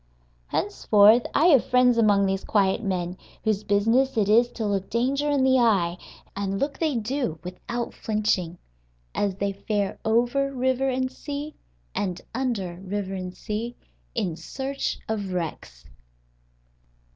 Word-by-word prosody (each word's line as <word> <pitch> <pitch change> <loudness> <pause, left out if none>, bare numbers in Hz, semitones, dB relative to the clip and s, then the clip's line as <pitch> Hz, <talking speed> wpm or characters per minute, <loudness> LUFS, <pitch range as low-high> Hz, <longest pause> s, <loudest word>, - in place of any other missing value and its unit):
Henceforth 215 - +4
I 310 - +4
have 275 -7 +6
friends 250 -1 +5
among 205 -3 +4
these 195 0 -1
quiet 200 0 +2
men 180 -3 -2 0.2
whose 215 -2 0
business 225 +6 +2
it 210 -3 +3
is 235 +3 +5
to 225 - -3
look 195 -2 -1
danger 270 +5 0
in 285 -2 +2
the 260 0 +4
eye 195 -8 +3 0.4
(and 195 0 -2
look 280 0 -2
they 315 -4 +1
do 230 - -2
without 235 +7 -5
flinching) 205 -5 -1 0.6
as 200 -2 0
they 200 0 -1
fare 200 0 -2
over 240 +5 +2
river 260 0 +1
and 260 0 -1
sea, 290 +3 -6 0.4
and 185 -3 -2
under 225 -9 -2
river 195 +1 -4
and 185 -1 -6
sea, 230 +3 -4 0.4
in 175 -4 -1
search 270 - -4
of 205 -4 -3
wrecks. 160 - -5
215 Hz, 140 wpm, -25 LUFS, 195-255 Hz, 0.6 s, have